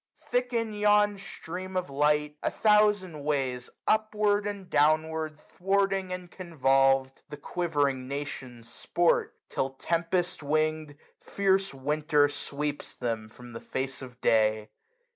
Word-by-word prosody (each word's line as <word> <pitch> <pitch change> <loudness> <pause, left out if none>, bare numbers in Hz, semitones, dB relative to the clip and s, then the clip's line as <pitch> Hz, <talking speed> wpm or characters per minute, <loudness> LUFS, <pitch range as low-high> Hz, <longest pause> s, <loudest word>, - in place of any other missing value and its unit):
Thick 245 0 -2
in 230 -2 -1
yon 210 -1 +3
stream 185 0 -6
of 185 - -1
light, 150 +1 +1
a - - 0
thousand 210 -7 +2
ways. 135 -4 -1 0.2
Upward, 210 -1 +2
and 200 -2 -5
downward, 155 0 +1
thwarting, 195 +2 0
and 180 -1 -6
convolved. 135 -6 +2
The 150 - -7
quivering 145 -5 -1
nations 130 -4 -6
sport 170 +8 0 0.2
j - - -15
till, 135 - 0
tempest 170 +4 -1
wing'd. 155 0 -1 0.2
Fierce 195 -1 +1
Winter 145 +2 +2
sweeps 145 0 -4
them 115 -3 -3
from 120 +2 -13
the 115 - -7
face 135 +1 -4
of 125 -2 -10
day. 110 -1 +2
155 Hz, 125 wpm, -28 LUFS, 135-190 Hz, 0.2 s, yon